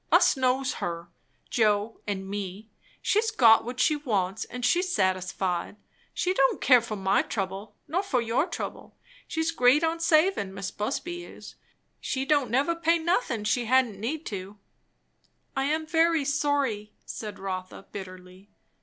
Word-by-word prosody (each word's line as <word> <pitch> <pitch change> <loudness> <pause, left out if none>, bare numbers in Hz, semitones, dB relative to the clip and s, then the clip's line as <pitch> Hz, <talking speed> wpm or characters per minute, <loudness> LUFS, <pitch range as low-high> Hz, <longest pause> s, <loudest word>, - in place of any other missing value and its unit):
"Us - - +5
knows 260 +1 +1
her, 170 0 -4 0.4
Joe 215 -1 +1
and 195 -2 -3
me. 200 +2 -6 0.3
She's 440 +2 +2
got 230 - +6
what 245 +1 -6
she 305 +4 +3
wants, 205 -10 -1
and 245 +1 -5
she's 360 +8 +2
satisfied. 185 - -1 0.4
She 370 - 0
don't 270 -6 +2
care 250 -3 +6
for 220 -2 -5
my 195 -1 +2
trouble, 195 0 -4
nor 350 +5 0
for 340 -11 0
your 240 +7 0
trouble. - - -6 0.3
She's 320 +1 -1
great 265 +1 +4
on 325 +1 0
savin', 310 - +2
Mis' 190 -1 -4
Busby 345 +11 -4
is. - - -11 0.5
She 265 0 -2
don't 285 -3 +2
never 275 +8 +2
pay 335 0 +2
nothin' 320 - 0
she 235 +3 +1
hadn't 245 -4 +2
need 290 +9 -3
to." 200 0 -6 1.0
"I 270 0 0
am 315 +2 0
very 325 -2 +2
sorry," 280 -8 0
said 210 -2 -6
Rotha 185 0 -6
bitterly. 185 0 -10
245 Hz, 150 wpm, -27 LUFS, 200-305 Hz, 1.0 s, got